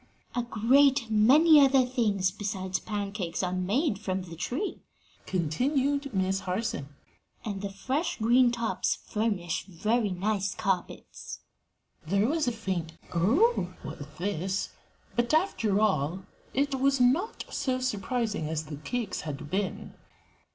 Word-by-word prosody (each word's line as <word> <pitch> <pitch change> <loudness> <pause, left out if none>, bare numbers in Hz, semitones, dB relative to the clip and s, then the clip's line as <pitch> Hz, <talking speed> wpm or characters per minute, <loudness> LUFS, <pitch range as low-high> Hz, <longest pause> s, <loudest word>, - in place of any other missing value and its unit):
"A 245 - 0
great 245 +2 +3
many 285 +8 +7
other 270 -1 +5
things 210 -7 +1
besides 190 -2 -3
pancakes 200 -5 -3
are 180 0 -1
made 200 - 0
from 190 -3 -2
the 170 -2 -9
tree," 260 - -3 0.5
continued 270 - 0
Miss 190 -2 0
Harson, 185 -7 -3 0.5
"and 200 -3 -3
the 200 - -3
fresh 265 - -2
green 240 +3 +4
tops 235 -1 0
furnish 205 -6 -1
very 210 +5 0
nice 195 +1 -1
carpets." 190 -2 -3 0.6
There 200 +6 +2
was 310 0 0
a - - +3
faint 190 -8 -3 0.2
"Oh!" 265 - +2
at 145 +1 -8
this, 190 +1 -2 0.5
but, 240 +5 +2
after 225 - +1
all, 185 -3 +1 0.3
it 280 +1 0
was 275 0 +3
not 280 - +2
so 255 -1 -1
surprising 220 -7 -1
as 160 -1 -2
the 150 -1 -7
cakes 210 +9 -3
had 145 -1 -6
been. 195 +1 -2
210 Hz, 130 wpm, -28 LUFS, 185-255 Hz, 0.6 s, many